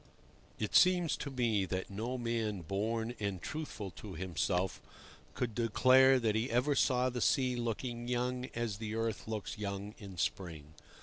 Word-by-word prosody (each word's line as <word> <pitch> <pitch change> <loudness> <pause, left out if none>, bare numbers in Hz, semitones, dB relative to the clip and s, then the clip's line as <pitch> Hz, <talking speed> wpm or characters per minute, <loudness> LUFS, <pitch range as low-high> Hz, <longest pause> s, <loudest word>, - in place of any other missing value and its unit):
IT 105 - -3
seems 180 -3 +5
to 140 - -5
me 120 -6 +1
that 95 +1 -3
no 115 +6 -3
man 115 -5 -1
born 110 +7 -1
and 100 -3 -2
truthful 130 - -5
to 95 +3 -9
himself 90 +1 -1 0.5
could 120 -3 -1
declare 130 +4 +5
that 110 -3 +1
he 110 +4 0
ever 125 +5 +2
saw 130 -2 +3
the 125 -1 -2
sea 130 -2 +3
looking 120 0 -3
young 125 +1 -1
as 115 -3 -2
the 110 -1 -4
earth 115 -2 -2
looks 110 0 -4
young 100 0 -4
in 100 -4 -9
spring. 80 -3 -3
115 Hz, 160 wpm, -33 LUFS, 100-125 Hz, 0.5 s, seems